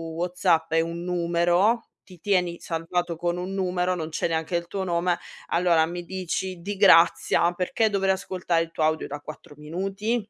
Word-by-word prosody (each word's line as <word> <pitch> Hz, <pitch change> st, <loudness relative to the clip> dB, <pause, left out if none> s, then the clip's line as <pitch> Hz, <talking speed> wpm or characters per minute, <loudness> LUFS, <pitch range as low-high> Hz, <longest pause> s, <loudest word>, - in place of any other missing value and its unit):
WhatsApp 170 Hz, -2 st, +1 dB
è 165 Hz, -, +4 dB
un 170 Hz, +1 st, -4 dB
numero, 175 Hz, +5 st, +1 dB, 0.2 s
ti 180 Hz, -2 st, -15 dB
tieni 180 Hz, -4 st, +1 dB
salvato 170 Hz, +1 st, -2 dB
con 175 Hz, +1 st, -1 dB
un 185 Hz, +2 st, -4 dB
numero, 185 Hz, -1 st, 0 dB
non 160 Hz, -2 st, -4 dB
c'è 155 Hz, -, -1 dB
neanche 160 Hz, +1 st, -2 dB
il 170 Hz, 0 st, -2 dB
tuo 195 Hz, 0 st, -3 dB
nome, 175 Hz, 0 st, +1 dB, 0.3 s
allora 170 Hz, -2 st, +3 dB
mi 175 Hz, 0 st, -6 dB
dici 185 Hz, 0 st, -4 dB
di 200 Hz, +4 st, -4 dB
grazia 175 Hz, -2 st, +5 dB
perché 185 Hz, +5 st, 0 dB
dovrei 195 Hz, -2 st, +1 dB
ascoltare 180 Hz, -3 st, -1 dB
il 165 Hz, -, -10 dB
tuo 160 Hz, -, -2 dB
audio 155 Hz, 0 st, 0 dB
da 145 Hz, +1 st, -6 dB
4 150 Hz, 0 st, -11 dB
minuti? 195 Hz, +9 st, -2 dB
175 Hz, 175 wpm, -25 LUFS, 165-185 Hz, 0.3 s, grazia